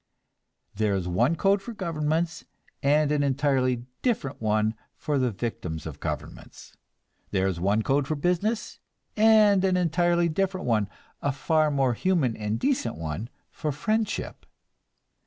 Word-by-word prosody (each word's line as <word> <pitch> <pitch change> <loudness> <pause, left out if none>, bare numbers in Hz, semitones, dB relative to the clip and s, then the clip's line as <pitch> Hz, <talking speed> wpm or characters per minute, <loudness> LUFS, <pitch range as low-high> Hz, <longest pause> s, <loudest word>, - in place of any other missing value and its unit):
There 105 -1 +1
is 90 -2 -2
one 120 - +2
code 195 +3 +2
for 235 +4 -7
governments, 165 -2 -1 0.4
and 150 +1 +3
an 150 -1 +2
entirely 130 -3 +1 0.2
different 215 - -1
one 110 0 +1 0.2
for 145 -2 -1
the 130 -1 +2
victims 95 -7 -4
of - - -7
governments. - - -7 0.5
There 95 0 +1
is 95 -3 -1
one 100 +5 +1
code 135 +2 +1
for 155 - -1
business, 180 +9 -1 0.4
and 215 -3 +5
an 185 -1 +3
entirely 175 0 +2
different 185 +3 -1
one, 110 -4 +1 0.3
a 140 - +1
far 155 +3 +2
more 135 -4 +2
human 145 - +1
and 105 +1 -2
decent 255 - 0
one, 80 +8 -4 0.2
for 155 - -3
friendship. 215 +9 -2
145 Hz, 140 wpm, -26 LUFS, 115-180 Hz, 0.5 s, and